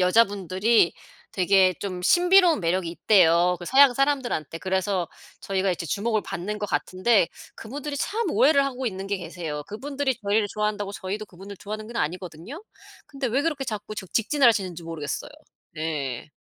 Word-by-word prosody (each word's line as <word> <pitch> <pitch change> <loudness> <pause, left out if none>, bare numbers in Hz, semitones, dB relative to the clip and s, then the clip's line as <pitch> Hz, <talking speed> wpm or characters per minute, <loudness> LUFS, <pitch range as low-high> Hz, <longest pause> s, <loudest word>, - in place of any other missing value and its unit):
여자분들이 195 +1 +3 0.4
되게 190 0 +4
좀 185 -3 -5
신비로운 355 - +5
매력이 170 0 0
있대요, 175 -1 +4
그 175 - -8
서양 265 +3 +6
사람들한테. 260 - -1
그래서 190 -1 -1 0.3
저희가 195 -1 -1
이제 170 -1 -3
주목을 215 +7 0
받는 210 +5 -5
것 210 - -3
같은데 185 +1 +2 0.3
그분들이 285 +5 -6
참 425 +6 -1
오해를 280 -2 +4
하고 260 -1 -5
있는 190 -3 -4
게 200 0 -1
계세요. 165 -4 -6
그분들이 270 +4 -2
저희를 205 +1 +2
좋아한다고 210 -1 -2
저희도 200 +3 -5
그분들 195 +3 -11
좋아하는 215 +3 -7
건 235 +1 -8
아니거든요. 180 - -4 0.4
근데 275 -2 -4
왜 255 +5 +1
그렇게 295 -3 -1
자꾸 215 -3 -5
적 190 -3 -8
직진을 265 +4 +3
하시는지 185 -7 +1
모르겠어요. 160 -3 -5 0.4
네. 145 -6 -4
200 Hz, 400 characters per minute, -25 LUFS, 180-240 Hz, 0.4 s, 서양